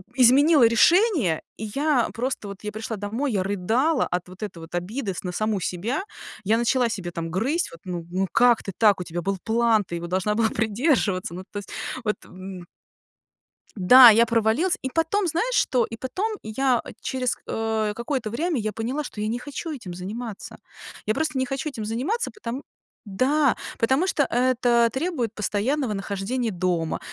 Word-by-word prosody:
изменила 270 +3 +6
решение, 270 - +4 0.2
и 220 - -5
я 285 -4 +2
просто 245 -3 -3
вот 200 0 -9
я 210 - -4
пришла 220 +1 -5
домой, 220 +6 -2
я 190 -2 +1
рыдала 225 - +1
от 180 0 -3
вот 185 +2 -14
этой 190 -5 -6
вот 165 0 -12
обиды 195 +4 -3
с - - -7
на 180 - -3
саму 215 +1 0
себя. 200 - -2 0.4
Я 220 +3 +3
начала 240 +1 +2
себя 190 -5 -4
там 165 -1 -4
грызть. 270 - 0
Вот, 170 - -13
ну 175 -3 -5
ну, 190 +2 -1
как 240 -1 +4
ты 195 - -5
так? 210 -4 +4
У - - -2
тебя 175 0 -5
был 195 +3 -1
план, 225 -1 +2
ты 170 - -6
его 170 0 -5
должна 190 +4 0
была 225 0 +2
придерживаться. 220 - 0
Ну, 185 +2 -7
то - - -6
есть 200 - -11 0.4
вот, 210 - +1
м. 185 -1 -9 1.1
Да, 245 +6 +9
я 230 +2 +5
провалилась 230 - +1
и 260 - -3
потом, 345 +5 +1
знаешь 360 +10 0
что? 250 - +2
И 225 - -7
потом 375 - -2
я 245 +3 +1 0.2
через, 255 -1 -1
э, 220 -1 -1
какое-то 235 -1 -2
время 315 +8 -1
я 215 -1 -2
поняла, 235 +8 -3
что 225 - -8
я 210 - -1
не 235 +3 -2
хочу 290 +5 -6
этим 230 - -7
заниматься. 205 +4 -7 0.5
Я 215 - +1
просто 305 +1 -1
не 260 - +1
хочу 270 +3 -3
этим 235 -7 -6
заниматься, 265 - -2
потом 270 - -6 0.4
Да! 260 +7 +2 0.2
Потому 265 +10 +2
что 295 - +2
это 245 -2 +2
требует 265 - -2
постоянного 220 +5 -1
нахождения 200 +5 -2
дома, 175 -3 -1
230 Hz, 180 wpm, -24 LUFS, 200-265 Hz, 1.1 s, Да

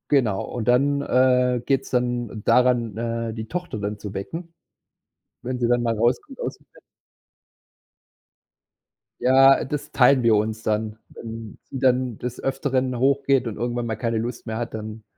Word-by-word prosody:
Genau. 115 -9 +2
Und 115 -3 -5
dann, 140 +3 +3
äh, 125 -2 +3
geht's 135 -1 0
dann 120 -3 -1
daran, 120 -4 +3
äh, 115 0 -2
die 110 0 -6
Tochter 175 -9 -4
dann 105 +1 -3
zu 100 -1 -7
wecken, 165 - -6 0.9
wenn 125 +1 -3
sie 120 - +1
dann 120 0 +2
mal 115 -2 0
rauskommt 120 +3 0
aus - - -3
dem - - -28
Bett. - - -19 2.4
Ja, 135 +1 +6
das 145 +1 -5
teilen 130 0 +5
wir 115 -1 +5
uns 110 +1 -1
dann. 110 0 -1
Wenn 115 -2 -9
sie - - -5
dann 125 -3 +1
des 125 0 -5
Öfteren 130 -2 0
hoch 135 +3 +2
geht 135 -3 +3
und 110 - -4
irgendwann 120 0 -2
mal 110 -1 -2
keine 115 +1 -1
Lust 120 +2 -4
mehr 110 0 -3
hat, 120 0 -4
dann 110 0 -7
120 Hz, 165 wpm, -23 LUFS, 110-130 Hz, 2.4 s, Ja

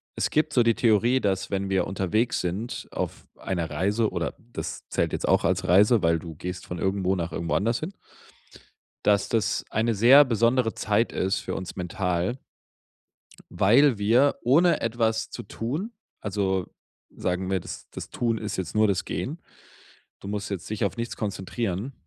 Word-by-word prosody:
Es - - 0
gibt 155 0 +1
so 120 - +5
die 115 -1 +3
Theorie, 120 +3 +3
dass 95 -2 -1
wenn 100 0 -1
wir 95 -1 +1
unterwegs 100 +4 0
sind 95 +7 -4
auf - - -5
einer 85 -4 -3
Reise, 100 +8 +1
oder 85 -2 -2
das 120 +1 -7
zählt - - 0
jetzt - - -2
auch - - +3
als 90 +1 0
Reise, 105 +5 +5
weil 85 -1 +2
du 80 0 -9
gehst 90 +3 -6
von 90 - -6
irgendwo 95 0 0
nach 85 -2 -3
irgendwo 85 +1 -3
anders 115 +4 +1
hin 190 - -5 1.1
dass 100 -1 +3
das 115 -2 0
eine 115 +1 +1
sehr 125 +8 +8
besondere 115 0 +2
Zeit 110 +2 +1
ist, 95 +2 0
für - - -4
uns 95 -2 -6
mental 90 +4 -1 1.1
weil 125 +6 +4
wir 120 +8 +3
ohne 165 +8 +4
etwas 115 -1 0
zu - - -6
tun 145 - -4 0.3
also 95 -3 -1 0.5
sagen 90 +1 -2
wir, 95 -1 +1
das - - -9
das - - -8
Tun 115 -2 0
ist 105 -1 -4
jetzt 95 0 -4
nur 110 0 +4
das 100 -3 0
Gehen. - - -4 0.8
Du - - -10
musst 105 0 -3
jetzt 95 -3 -5
dich 110 - -2
auf 100 - -3
nichts 115 0 -4
konzentrieren. 105 +3 -3
105 Hz, 170 wpm, -26 LUFS, 95-115 Hz, 1.1 s, sehr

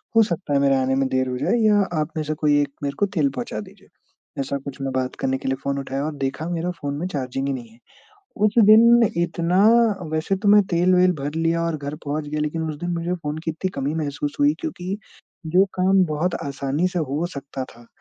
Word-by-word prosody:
हो 225 - +7
सकता 170 -6 -3
है 140 - +4
मेरे 140 -1 +3
आने 130 0 +1
में 135 0 +1
देर 130 0 0
हो 125 - -3
जाए 125 - 0
या 210 -1 +5 0.2
आप 150 - -1
में 155 - 0
से 155 +1 -2
कोई 150 -1 +2
एक 145 - -1
मेरे 140 0 -1
को - - +4
तेल 150 -5 +3
पहुँचा 120 -3 -4
दीजिए। 105 - -12 0.5
ऐसा 135 +1 -2
कुछ 140 0 -9
मैं 135 0 -2
बात 130 0 -2
करने 130 0 0
के - - -7
लिए 135 - +1
फ़ोन 140 0 -1
उठाया 135 +1 -3
और 155 -1 -4
देखा 135 +4 -3
मेरा 170 0 -2
फ़ोन 145 -5 -5
में 165 - -3
चार्जिंग 135 -4 -3
ही 140 - 0
नहीं 120 -3 -7
है। 115 - -20 0.7
उस 210 - -1
दिन 235 +2 +7 0.2
इतना 175 +1 0 0.5
वैसे 160 +5 0
तो 205 +2 -1
मैं 205 0 +7
तेल-वेल 180 +1 +4
भर 145 +2 -4
लिया 165 +1 +1
और 165 -1 -1
घर 145 0 -5
पहुँच 150 +1 -3
गया 150 +1 -2
लेकिन 150 +2 -2
उस 150 - -6
दिन 175 - -3
मुझे 170 +1 -2
फ़ोन 155 -3 -4
की - - 0
इतनी 165 +4 -3
कमी 145 +3 -2
महसूस 145 -2 -3
हुई, 290 +1 +4
क्योंकि 200 - -4 0.5
जो 180 +5 +4
काम 190 +1 +4
बहुत 160 +3 -1
आसानी 140 +5 -1
से 180 - -3
हो 150 +1 -1
सकता 140 -1 -5
था, 120 -1 -16
150 Hz, 235 wpm, -22 LUFS, 140-175 Hz, 0.7 s, हो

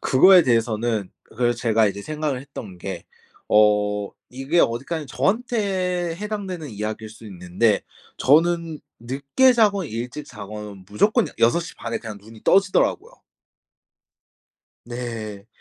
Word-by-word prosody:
그거에 180 +7 +6
대해서는 115 -4 0
그거를 120 +1 -1
제가 115 -2 +2
이제 100 +1 -6
생각을 150 -2 -3
했던 115 -9 -10
게 - - -6 0.4
어 105 -1 +3 0.2
이게 135 +7 -1
어디까지 140 +6 0
저한테 190 - -1
해당되는 195 -6 -5
이야기일 110 0 -5
수 110 +1 -14
있는데 95 +3 0 0.4
저는 165 +2 +2 0.2
늦게 140 - +2
자건 205 -6 +2
일찍 125 +6 -6
자건 105 -3 -9
무조건 215 - +2
야 - - -12
6:30 120 -2 0
에 - - 0
그냥 110 -3 -8
눈이 110 +1 -15
떠지더라고요. 195 - +2 1.7
네. 115 -4 -6
125 Hz, 260 characters per minute, -23 LUFS, 110-175 Hz, 1.7 s, 그거에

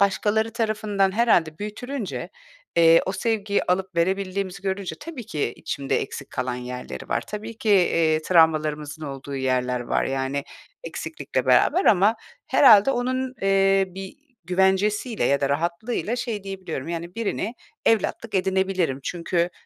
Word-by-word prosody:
başkaları 210 +3 +1
tarafından 215 -4 0
herhâlde 175 -9 +2
büyütülünce, 220 +2 -5 0.5
eee, 165 0 +7
o 190 - -1
sevgiyi 210 -3 0
alıp 185 0 -1
verebildiğimizi 190 +2 -1
görünce 195 -1 -3
tabii 295 -8 -8
ki 145 -6 -2
içimde 140 -1 -2
eksik 135 - -7
kalan 125 -1 -2
yerleri 125 - -7
var. - - 0
Tabii 215 +2 -7
ki, 220 - -3
eee, 165 -5 +3
travmalarımızın 155 -3 +2
olduğu 135 0 -6
yerler 125 -1 0
var. 120 - 0
Yani, 135 +1 -2 0.4
eksiklikle - - -4
beraber 370 - +4
ama 205 +3 +4 0.3
herhâlde 225 -2 +7
onun, 255 +1 -1
eee, 195 0 +4
bir 190 +1 -9 0.3
güvencesiyle 190 +5 +1
ya 140 - +2
da 140 - +1
rahatlığıyla 170 - -1
şey 230 -5 -4
diyebiliyorum, 185 -7 -5
yani, 170 +1 -5
birini 225 0 -2 0.3
evlatlık 225 0 +1
edinebilirim. 190 -6 0
Çünkü 170 +2 -1
190 Hz, 130 wpm, -24 LUFS, 160-210 Hz, 0.5 s, eee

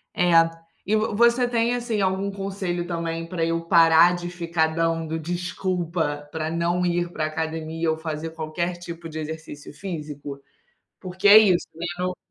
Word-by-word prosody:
É, 180 0 +2 0.5
e 210 - +1
v 215 +1 +1
você 235 +2 +4
tem, 235 0 +1
assim, 240 -3 -2
algum 190 +1 0
conselho 195 -3 -3
também 165 -1 -3
para 170 -1 -2
eu 165 0 -1
parar 170 0 +6
de 175 0 -5
ficar 170 -2 0
dando 165 0 -1
desculpa 175 -3 -2
para 160 -1 -3
não 170 +2 0
ir 175 0 0
pra 155 - -2
academia, 160 +1 -3
ou 160 - 0
fazer 160 0 -4
qualquer 165 +2 -3
tipo 170 -1 -8
de 160 - -7
exercício 155 -2 -7
físico? 150 -6 -7 0.6
Porque 185 +2 0
é 205 - +10
isso, 190 -5 +3
mesmo 175 +2 -3
no 180 - -7
170 Hz, 160 wpm, -24 LUFS, 160-185 Hz, 0.6 s, é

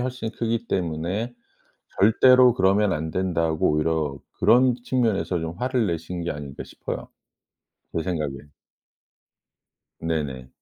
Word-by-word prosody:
훨씬 125 -3 -3
크기 115 0 -2
때문에 90 +7 -2 0.7
절대로 125 +4 +6
그러면 100 0 +3
안 80 +1 -2
된다고 85 -4 0
오히려 75 -2 0 0.2
그런 125 0 +5
측면에서 110 -9 0
좀 80 +1 -4
화를 125 -3 0
내신 85 +1 -3
게 85 - -2
아닌가 70 -2 -6
싶어요 - - -6 0.9
제 80 - +1
생각에. 75 -6 -2 1.7
네네. 75 -6 -3
90 Hz, 250 characters per minute, -24 LUFS, 80-115 Hz, 1.7 s, 절대로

